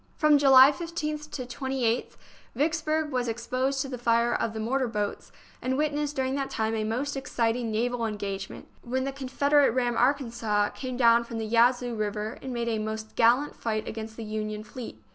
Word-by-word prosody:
From 305 -2 +4
July 270 -1 +8
15th 305 -2 -4
to 255 -4 -5
28th 250 -2 -2 0.4
Vicksburg 310 +2 0
was 250 -2 -1
ex 230 +1 -5
posed 265 +1 0
to - - -6
the 255 -2 -6
fire 235 0 +2
of 225 - -1
the 220 - -5
mortar 255 +4 0
boats, 210 -3 -3 0.3
and 260 +1 -1
wit 300 0 +1
nessed 295 0 -2
during 265 0 0
that 275 -1 -2
time 220 0 -1
a 220 -1 -1
most 250 +7 -2
exciting 235 -3 -1
naval 235 +1 0
engagement, 200 -2 -5
when 260 +2 -2
the 275 - -2
Confederate 280 +2 +2
ram 245 -1 0
Arkansas 235 -5 +1
came 255 -2 -6
down 235 -1 +5
from 235 -1 -7
the 220 - -2
Yazoo 240 +2 +3
River 215 0 -3
and 265 - -6
made 235 -1 -2
a 225 -2 0
most 220 0 -5
gallant 245 +6 +3
fight 215 -2 -3
against 220 0 -6
the 230 - -5
Union 215 0 -4
fleet. 240 +2 -9
245 Hz, 190 wpm, -27 LUFS, 225-270 Hz, 0.4 s, July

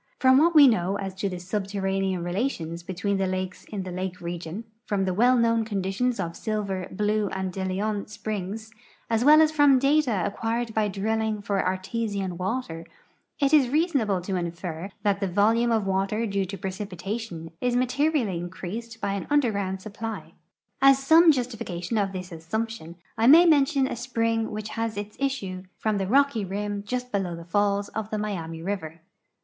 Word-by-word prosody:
From 260 0 +5
what 335 +2 +3
we 290 -2 +9
know 200 -4 +1
as 195 -1 -4
to 195 +1 -2
the 180 - -5
subterranean 195 -1 -2
relations 175 -3 -2
between 195 +3 -2
the 195 0 0
lakes 185 0 -4
in 200 -3 -5
the 185 - -6
lake 185 0 -4
region, 175 +3 -5 0.2
from 195 -2 0
the 185 - 0
well 245 +6 +4
known 230 -1 +3
conditions 210 +4 -1
of 170 0 -3
Silver, 200 -4 -3
Blue, 210 +1 0
and 190 -1 -3
De 190 - -3
Leon 200 +2 -2
springs, 215 +1 -5 0.4
as 225 +1 +2
well 305 +3 +8
as 310 - +2
from 290 -3 +5
data 275 - +2
acquired 230 +2 -2
by 215 -1 +1
drilling 220 +2 -1
for 200 -1 -1
artesian 190 0 -2
water, 185 -3 -3 0.6
it 280 0 +2
is 280 -5 +5
reasonable 275 - +1
to 185 +1 -2
infer 170 +1 -4
that 200 -1 +2
the 195 - -1
volume 220 +6 +3
of 220 -3 +1
water 195 +4 0
due 200 -2 -1
to 195 +2 -6
))recipitation 190 -2 -5
is 245 -1 +1
materially 255 - +1
increased 200 +6 -6
b}' - - +1
an 200 0 -3
under 290 -5 +3
ground 195 -2 -2
supi)ly. 220 +2 -6 0.5
As 275 0 +7
some 320 +5 +6
justification 225 - -2
of 195 -1 0
this 185 -1 -6
assumption, 170 +1 -4 0.2
I 225 - +4
may 325 +6 +9
mention 285 -3 +4
a - - -3
spring 230 -2 -1
which 215 0 -5
has 225 -2 -3
its 205 +1 -5
issue 200 -10 -2
from 215 -2 0
the 190 - -1
rocky 275 -1 +3
rim 205 +1 -3
just 250 +1 -3
l)elow 185 -5 -2
the 170 - -10
falls 200 +2 +1
of 220 -1 -5
the 215 - -2
Miami 165 -6 -4
river. 170 -4 -4
205 Hz, 175 wpm, -26 LUFS, 185-230 Hz, 0.6 s, we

